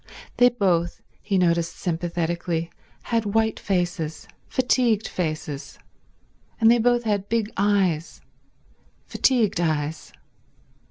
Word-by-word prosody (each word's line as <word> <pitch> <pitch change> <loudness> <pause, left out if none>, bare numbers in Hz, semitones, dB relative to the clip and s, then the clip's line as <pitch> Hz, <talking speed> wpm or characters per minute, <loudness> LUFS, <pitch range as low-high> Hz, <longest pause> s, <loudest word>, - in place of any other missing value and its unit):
They 245 0 +7
both, 180 -8 0 0.2
he 200 -2 0
noticed 170 -2 +1
sympathetically, 170 -1 -2 0.3
had 225 -3 -1
white 220 -1 +2
faces, 175 -5 -2 0.2
fatigued 245 -4 +1
faces, 155 -4 -4 0.8
and 225 -1 +6
they 240 - +4
both 240 +1 +2
had 205 -3 -1
big 225 -1 0
eyes, 190 -5 +1 0.9
fatigued 225 -9 +2
eyes. 155 -1 -2
185 Hz, 100 wpm, -24 LUFS, 170-225 Hz, 0.9 s, They